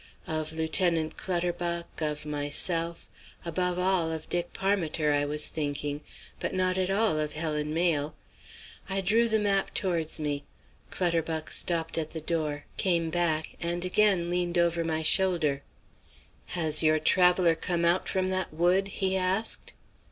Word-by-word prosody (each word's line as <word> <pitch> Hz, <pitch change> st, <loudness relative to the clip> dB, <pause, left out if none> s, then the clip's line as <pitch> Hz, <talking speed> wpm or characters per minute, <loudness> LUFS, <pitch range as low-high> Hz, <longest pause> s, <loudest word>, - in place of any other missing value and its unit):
Of 155 Hz, -1 st, -3 dB
Lieutenant 160 Hz, 0 st, +2 dB
Clutterbuck, 175 Hz, -2 st, -2 dB
of 150 Hz, -1 st, -2 dB
myself, 165 Hz, +3 st, -2 dB, 0.4 s
above 180 Hz, +1 st, -1 dB
all 180 Hz, -3 st, +1 dB
of 160 Hz, -1 st, -5 dB
Dick 175 Hz, 0 st, -1 dB
Parmiter, 170 Hz, -6 st, 0 dB
I 145 Hz, 0 st, +1 dB
was 150 Hz, +1 st, +1 dB
thinking, 145 Hz, -1 st, -3 dB, 0.4 s
but -, -, -3 dB
not 185 Hz, 0 st, +1 dB
at 185 Hz, 0 st, 0 dB
all 200 Hz, -5 st, +2 dB
of 150 Hz, -1 st, -2 dB
Helen 150 Hz, -1 st, -2 dB
Mayle. 155 Hz, -3 st, 0 dB, 0.7 s
I 195 Hz, 0 st, 0 dB
drew 225 Hz, +5 st, +3 dB
the 220 Hz, -1 st, +2 dB
map 200 Hz, -2 st, 0 dB
towards 170 Hz, -5 st, 0 dB
me. 145 Hz, -2 st, -2 dB, 0.5 s
Clutterbuck 165 Hz, -3 st, -1 dB
stopped 165 Hz, -1 st, 0 dB
at 155 Hz, -1 st, -3 dB
the 160 Hz, -, -6 dB
door, 155 Hz, -2 st, -2 dB
came 170 Hz, -3 st, +1 dB
back 160 Hz, -2 st, 0 dB
and 175 Hz, +1 st, 0 dB
again 185 Hz, -2 st, +2 dB
leaned 175 Hz, 0 st, 0 dB
over 170 Hz, -1 st, +2 dB
my 160 Hz, -1 st, -1 dB
shoulder. 165 Hz, -6 st, +3 dB, 1.0 s
"Has 155 Hz, -3 st, +4 dB
your 155 Hz, -1 st, +4 dB
traveller 180 Hz, +2 st, +4 dB
come 170 Hz, +1 st, -1 dB
out 170 Hz, +2 st, +2 dB
from 185 Hz, -1 st, 0 dB
that 185 Hz, -1 st, -1 dB
wood?" 175 Hz, +5 st, +2 dB
he 190 Hz, -1 st, 0 dB
asked. 190 Hz, +4 st, -1 dB
170 Hz, 145 wpm, -28 LUFS, 155-185 Hz, 1.0 s, Has